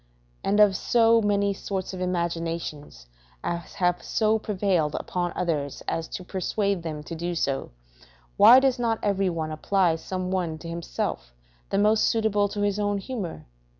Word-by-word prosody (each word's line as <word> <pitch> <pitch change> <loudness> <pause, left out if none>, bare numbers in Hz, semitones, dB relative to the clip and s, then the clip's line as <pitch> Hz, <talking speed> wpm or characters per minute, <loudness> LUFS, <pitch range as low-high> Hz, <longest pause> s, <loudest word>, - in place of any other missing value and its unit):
And 205 +2 +1
of 205 -2 +6
so 230 +2 +4
many 200 -1 +1
sorts 190 -1 -4
of 185 - -6
imaginations 165 - -3 0.4
as 170 0 -4
have 180 -2 +1
so 220 0 +1
prevailed 185 -8 0
upon 175 -1 -2
others 150 -6 -2
as 165 0 -2
to 185 - -6
persuade 195 +1 -1
them 155 -2 -5
to 165 - -8
do 170 +2 -3
so, 140 -4 -1 0.7
why 250 - +9
does 265 -2 +1
not 230 -2 +1
every 195 -2 +1
one 160 -2 -3
apply 170 +1 +1
some 185 +2 -4
one 175 -4 -1
to 165 - -10
himself, 110 - -4 0.3
the 195 - 0
most 210 +2 +4
suitable 210 -2 +2
to 205 0 -4
his 205 0 0
own 205 0 0
humour? 195 - -5
185 Hz, 160 wpm, -26 LUFS, 165-205 Hz, 0.7 s, why